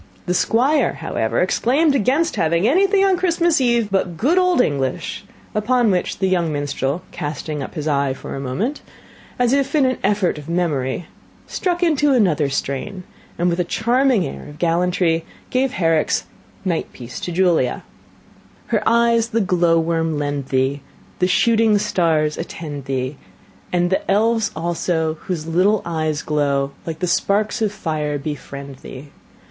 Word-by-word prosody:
The 180 Hz, -, 0 dB
Squire, 260 Hz, -, +2 dB
however, -, -, -1 dB
exclaimed 285 Hz, +6 st, +2 dB
against 275 Hz, -, +1 dB
having 170 Hz, +5 st, +2 dB
anything 390 Hz, -, +4 dB
on 380 Hz, -2 st, +3 dB
Christmas 340 Hz, -3 st, +2 dB
eve 235 Hz, -4 st, +2 dB
but 185 Hz, -3 st, 0 dB
good 310 Hz, -, +3 dB
old 365 Hz, -3 st, +3 dB
English; 140 Hz, -, -1 dB, 0.3 s
upon 230 Hz, +1 st, +2 dB
which 180 Hz, -1 st, -1 dB
the 190 Hz, -, 0 dB
young 175 Hz, -3 st, +1 dB
minstrel, 145 Hz, +1 st, -2 dB
casting 150 Hz, 0 st, -4 dB
up -, -, -7 dB
his 155 Hz, -1 st, -3 dB
eye 140 Hz, -2 st, +1 dB
for -, -, -7 dB
a -, -, -4 dB
moment, 190 Hz, -, -2 dB, 0.6 s
as 245 Hz, 0 st, +2 dB
if 275 Hz, +1 st, +1 dB
in 290 Hz, -3 st, +4 dB
an 255 Hz, 0 st, 0 dB
effort 195 Hz, -6 st, +1 dB
of 150 Hz, +2 st, -10 dB
memory, 160 Hz, -4 st, -1 dB, 0.4 s
struck 355 Hz, -1 st, -1 dB
into 295 Hz, -4 st, +3 dB
another 170 Hz, -, +2 dB
strain, 140 Hz, +8 st, -3 dB, 0.3 s
and, 175 Hz, -, +1 dB
with 175 Hz, 0 st, 0 dB
a -, -, +3 dB
charming 235 Hz, +2 st, +2 dB
air -, -, -7 dB
of 145 Hz, 0 st, -11 dB
gallantry, 170 Hz, 0 st, +1 dB, 0.3 s
gave 260 Hz, +1 st, +1 dB
Herrick's 165 Hz, -3 st, +1 dB, 0.4 s
"Night 170 Hz, -3 st, -1 dB
Piece 120 Hz, 0 st, -8 dB
to 175 Hz, -, -4 dB
Julia:" 170 Hz, -8 st, +1 dB, 0.9 s
"Her -, -, +1 dB
eyes 235 Hz, 0 st, +3 dB
the 230 Hz, -1 st, 0 dB
glow 175 Hz, -3 st, +3 dB
worm 165 Hz, -1 st, 0 dB
lend 145 Hz, -2 st, -2 dB
thee, 135 Hz, +2 st, 0 dB, 0.4 s
The 180 Hz, -, +3 dB
shooting 220 Hz, +2 st, +3 dB
stars 165 Hz, -7 st, +1 dB
attend 145 Hz, -4 st, -6 dB
thee, 135 Hz, +1 st, -3 dB, 0.5 s
And 175 Hz, 0 st, +1 dB
the 190 Hz, -, -1 dB
elves 220 Hz, +1 st, +2 dB
also, 160 Hz, -1 st, -1 dB
Whose 170 Hz, -5 st, -3 dB
little 185 Hz, +6 st, +2 dB
eyes 155 Hz, -2 st, -2 dB
glow 140 Hz, -2 st, 0 dB, 0.2 s
Like 160 Hz, -1 st, -3 dB
the -, -, +1 dB
sparks 205 Hz, +6 st, +1 dB
of 215 Hz, -2 st, +1 dB
fire, 150 Hz, -6 st, -2 dB
befriend 140 Hz, -1 st, -7 dB
thee. 135 Hz, +2 st, -11 dB
175 Hz, 155 wpm, -20 LUFS, 150-230 Hz, 0.9 s, anything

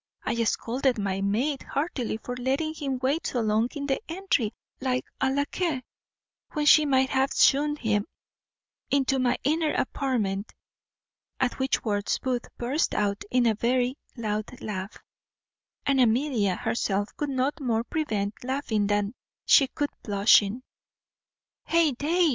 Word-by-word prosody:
I 235 Hz, 0 st, 0 dB
scolded 250 Hz, +3 st, 0 dB
my 195 Hz, -2 st, -1 dB
maid 245 Hz, +9 st, 0 dB
heartily 275 Hz, -7 st, -2 dB
for 245 Hz, +3 st, -6 dB
letting 270 Hz, +5 st, -1 dB
him 280 Hz, -4 st, -3 dB
wait 285 Hz, +5 st, +1 dB
so 245 Hz, -, -1 dB
long 220 Hz, +1 st, +1 dB
in 285 Hz, -1 st, -3 dB
the 270 Hz, -1 st, 0 dB
entry 330 Hz, -, 0 dB, 0.3 s
like 255 Hz, -1 st, -1 dB
a 265 Hz, -, +2 dB
lacquais, 285 Hz, +1 st, -1 dB, 0.7 s
when 300 Hz, -2 st, -1 dB
she 300 Hz, 0 st, +7 dB
might 265 Hz, -1 st, +3 dB
have 270 Hz, 0 st, +1 dB
shewn 295 Hz, +2 st, +4 dB
him 215 Hz, -6 st, 0 dB, 0.8 s
into 270 Hz, -1 st, +2 dB
my 250 Hz, -1 st, +2 dB
inner 310 Hz, +2 st, +1 dB
apartment." 225 Hz, -8 st, -1 dB, 0.9 s
At 260 Hz, 0 st, 0 dB
which 265 Hz, 0 st, 0 dB
words 205 Hz, -2 st, 0 dB
Booth 250 Hz, -2 st, -2 dB
burst 265 Hz, +7 st, 0 dB
out 200 Hz, -1 st, 0 dB
into 245 Hz, -2 st, +3 dB
a -, -, 0 dB
very 245 Hz, +3 st, +1 dB, 0.2 s
loud 215 Hz, +1 st, -3 dB
laugh; 195 Hz, -1 st, -5 dB, 0.9 s
and 275 Hz, -2 st, +3 dB
Amelia 230 Hz, -5 st, +2 dB
herself 205 Hz, -1 st, -1 dB
could 295 Hz, -, -2 dB
no 265 Hz, +1 st, +1 dB
more 230 Hz, -5 st, 0 dB
prevent 220 Hz, -9 st, -2 dB
laughing 245 Hz, -6 st, -1 dB
than 205 Hz, +1 st, 0 dB, 0.3 s
she 275 Hz, -, +6 dB
could 290 Hz, +2 st, -3 dB
blushing. 205 Hz, +2 st, +3 dB, 1.0 s
"Heyday!" 330 Hz, +1 st, +2 dB
255 Hz, 135 wpm, -27 LUFS, 215-280 Hz, 1.0 s, she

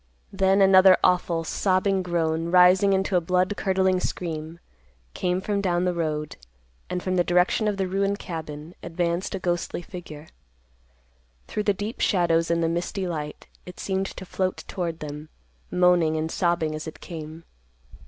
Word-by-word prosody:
Then 195 Hz, 0 st, +3 dB
another 190 Hz, -1 st, +7 dB
awful, 175 Hz, -2 st, +2 dB
sobbing 190 Hz, +3 st, +1 dB
groan, 165 Hz, -2 st, -1 dB
rising 185 Hz, +3 st, +6 dB
into 190 Hz, 0 st, 0 dB
a -, -, +2 dB
blood 180 Hz, +4 st, +1 dB
curdling 190 Hz, -2 st, +1 dB
scream, 165 Hz, -2 st, -4 dB, 0.5 s
came 180 Hz, 0 st, -1 dB
from 200 Hz, 0 st, -1 dB
down 180 Hz, -2 st, +1 dB
the 180 Hz, -, +1 dB
road, 155 Hz, -3 st, -3 dB, 0.5 s
and, 180 Hz, 0 st, -3 dB
from 185 Hz, -1 st, -1 dB
the 175 Hz, -, +4 dB
direction 180 Hz, +5 st, +2 dB
of 205 Hz, -2 st, -1 dB
the 190 Hz, -1 st, -1 dB
ruined 195 Hz, +2 st, 0 dB
cabin, 160 Hz, -3 st, -7 dB
advanced 170 Hz, +2 st, -2 dB
a -, -, -4 dB
ghostly 175 Hz, -1 st, -2 dB
figure. 160 Hz, -4 st, -9 dB, 1.2 s
Through 210 Hz, -, -3 dB
the 205 Hz, -, +3 dB
deep 210 Hz, +4 st, -5 dB
shadows 165 Hz, -4 st, +2 dB
and 170 Hz, 0 st, +1 dB
the -, -, +2 dB
misty 175 Hz, +3 st, -2 dB
light, 150 Hz, -3 st, -5 dB, 0.2 s
it 180 Hz, -, -10 dB
seemed 190 Hz, 0 st, -1 dB
to 190 Hz, -, -9 dB
float 185 Hz, 0 st, -2 dB
toward 170 Hz, -4 st, -4 dB
them, 150 Hz, +1 st, -7 dB, 0.4 s
moaning 175 Hz, -3 st, +3 dB
and 160 Hz, +1 st, -2 dB
sobbing 170 Hz, -3 st, 0 dB
as 155 Hz, +1 st, -6 dB
it 160 Hz, -, -8 dB
came. 160 Hz, -1 st, -8 dB
180 Hz, 160 wpm, -25 LUFS, 165-190 Hz, 1.2 s, another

